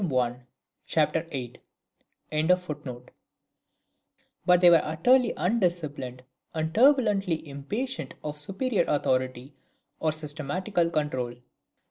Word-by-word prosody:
i 130 -8 +1 0.5
c. 155 -2 +3 1.3
viii.] 150 -6 0 1.5
But 180 0 +6
they 175 - +8
were 165 -2 +6
utterly 235 +11 +3
undisciplined, 170 - -1 0.3
and 160 0 -2
turbulently 210 - +3
impatient 205 - -4
of 150 -1 -4
superior 195 - -1
authority, 130 -1 0 0.5
or 155 - +1
systematical 160 +4 -1
control. 130 -7 -2
160 Hz, 85 wpm, -27 LUFS, 145-185 Hz, 1.5 s, they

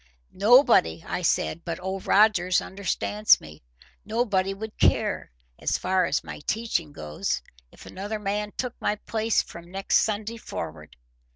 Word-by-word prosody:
"Nobody," 205 - +5
I - - -2
said, 170 -1 0
"but 165 -2 -4
Old 190 +1 -5
Rogers 190 -4 +4
understands 200 +2 +2
me. 75 0 -13 0.4
Nobody 205 -4 0
would 215 +2 -7
care, 95 -4 +2 0.3
as - - 0
far 185 -1 +1
as - - 0
my - - -8
teaching 215 -9 -1
goes, 75 - -3 0.3
if - - -15
another 205 +3 -5
man 210 0 -2
took 250 -2 -2
my 210 - +1
place 220 +1 0
from 170 0 -12
next 195 +2 +1
Sunday 215 +1 -1
forward. 80 - -7
195 Hz, 145 wpm, -26 LUFS, 170-215 Hz, 0.4 s, Nobody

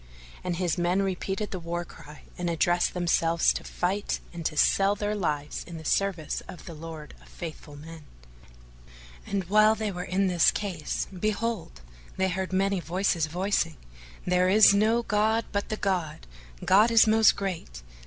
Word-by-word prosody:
and 180 -1 -2
his 175 -1 -1
men 180 +3 +1
repeated 195 +2 -3
the 185 - -4
war 170 +1 -4
cry 150 -2 -14
and 175 -1 -3
addressed 175 +2 +1
themselves 170 -1 +2
to - - -5
fight 195 +3 -2
and 170 -1 -6
to 155 - -2
sell 195 +5 +3
their 205 0 -2
lives 150 -7 -3
in 170 -1 -8
the 160 - -10
service 185 -5 -1
of 175 - -11
the 170 - -8
Lord 160 -1 -9
of - - -19
Faithful 155 -3 -9
Men; 160 +2 -11 1.2
and 200 -1 -1
while 215 +4 +4
they 215 -2 -3
were 180 -1 -5
in 185 +2 0
this 180 -2 +4
case, 185 -7 -3
behold, 210 - -3 0.4
they 190 0 +1
heard 190 +1 -3
many 195 0 +1
voices 170 0 0
voicing, 175 -1 -1 0.5
"There 180 0 +2
is 205 +1 +7
no 220 +4 +2
god 220 +2 +1
but 200 -1 -2
the 215 - -2
God! 180 -7 -2 0.4
God 210 +5 +5
is 230 -1 +6
most 220 0 +5
great! 170 - -5
185 Hz, 165 wpm, -27 LUFS, 165-200 Hz, 1.2 s, is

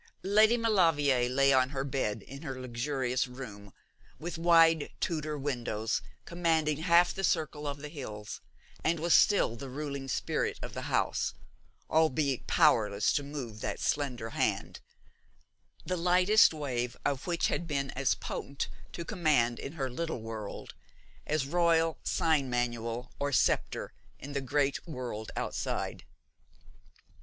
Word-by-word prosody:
Lady 215 +4 +5
Maulevrier 160 - +3
lay 135 +1 +4
on 130 -1 +4
her 135 -1 -3
bed 130 -6 -2
in 135 +1 -10
her 135 -5 -5
luxurious 130 +1 -1
room, 105 -6 -9 0.5
with 170 +1 -5
wide 165 -2 +5
Tudor 155 -3 -2
windows 120 -5 -2 0.2
commanding 160 -3 +1
half 170 +2 +4
the 195 - -5
circle 155 -4 0
of 140 0 -3
the - - -4
hills, 110 -9 -7 0.4
and 165 0 +1
was 170 +2 +2
still 200 - +4
the 135 +3 -7
ruling 140 0 -5
spirit - - -1
of - - -6
the - - -5
house, - - 0 0.5
albeit 150 -4 +1
powerless 105 -2 +3
to 145 - +1
move 135 -7 -7
that - - -3
slender 125 -6 -1
hand, - - -1 1.1
the 185 - -1
lightest 180 +5 +5
wave 125 -6 -3
of 140 +3 -1
which 170 -1 +1
had 170 - -2
been 140 -3 -1
as 135 +1 +1
potent 140 0 -4 0.2
to 170 - -5
command 150 - +2
in 140 - -6
her 135 -5 -2
little 130 -1 -4
world 110 -2 -7 0.5
as 150 -2 0
royal 165 +1 +2
sign 155 -5 +1
manual 120 0 -2
or 145 0 -1
sceptre - - +1 0.2
in 140 +2 -8
the 140 - -1
great 140 +3 0
world 125 -7 -5
outside. - - -3
140 Hz, 140 wpm, -30 LUFS, 125-165 Hz, 1.1 s, Lady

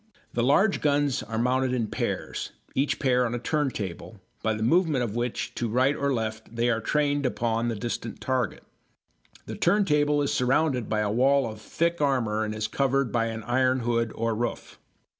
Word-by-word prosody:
The 120 - 0
large 170 - +3
guns 145 -2 +2
are 110 +1 -5
mounted 130 +2 +1
in 120 -3 0
pairs, - - -3 0.2
each 140 +2 +1
pair 125 -2 +2
on 120 0 -1
a - - -1
turntable, 115 - -3 0.2
by 110 -1 0
the 110 - -3
movement 155 -1 +3
of 110 -2 -3
which 120 0 -2
to 120 - -2
right 130 +5 +2
or 140 0 0
left 110 -2 -3
they 120 +1 +2
are 115 -1 0
trained 145 +3 +1
upon 115 -2 0
the 115 - -1
distant 115 +1 -4
target. 130 -4 -1 0.8
The - - -6
turntable 150 -6 +2
is 140 - 0
surrounded 130 -1 +1
by 110 -1 +1
a 105 -1 0
wall 135 +4 +3
of 110 -1 -7
thick 170 +8 -1
armour 115 -7 +1
and 110 0 -3
is 110 0 -2
covered 135 +1 +1
by 115 -1 +1
an 115 -1 -5
iron 130 +2 +2
hood 115 -1 0
or 115 0 0
roof. 120 +2 -4
125 Hz, 185 wpm, -26 LUFS, 115-140 Hz, 0.8 s, large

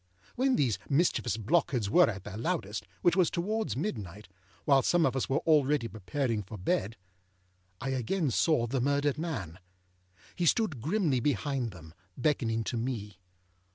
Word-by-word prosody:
When 260 +1 +2
these 125 -7 +1
mischievous 140 -6 +1
blockheads 125 -2 +1
were 105 - +5
at 95 -4 -5
their 105 0 -8
loudest, 115 - -3 0.2
which 175 - +4
was 185 -4 +4
towards 215 +5 -2
midnight, 105 - -4 0.4
while 140 -2 +5
some 175 +4 +3
of 135 - 0
us 135 - -1
were 135 - +1
already 145 -5 +3
preparing 115 +2 -2
for 105 +2 -9
bed, 100 +3 -1 0.8
I 135 - -3
again 135 - 0
saw 140 -2 +2
the 125 +2 -1
murdered 145 +2 +1
man. 110 - -4 0.8
He 175 -1 0
stood 160 - +1
grimly 160 - +1
behind 135 -2 -1
them, 80 -5 -13 0.2
beckoning 115 -5 0
to 120 - -3
me. 110 -5 -4
135 Hz, 155 wpm, -30 LUFS, 110-155 Hz, 0.8 s, were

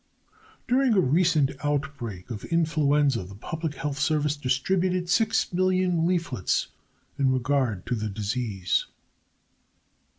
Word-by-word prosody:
During 255 -2 +3
a - - +5
recent 160 -2 +3
outbreak 135 -9 -3
of 105 -3 -6
influenza 150 - +2
the 95 +2 -11
Public 160 - -5
Health 140 0 -4
Service 150 -1 +1
distributed 175 +7 0
6,000,000 185 -4 +1
leaflets 170 - 0 0.5
in 135 -2 +3
regard 130 -6 0
to 125 - -2
the 110 -2 -2
disease. 105 -2 -1
145 Hz, 105 wpm, -26 LUFS, 125-175 Hz, 0.5 s, a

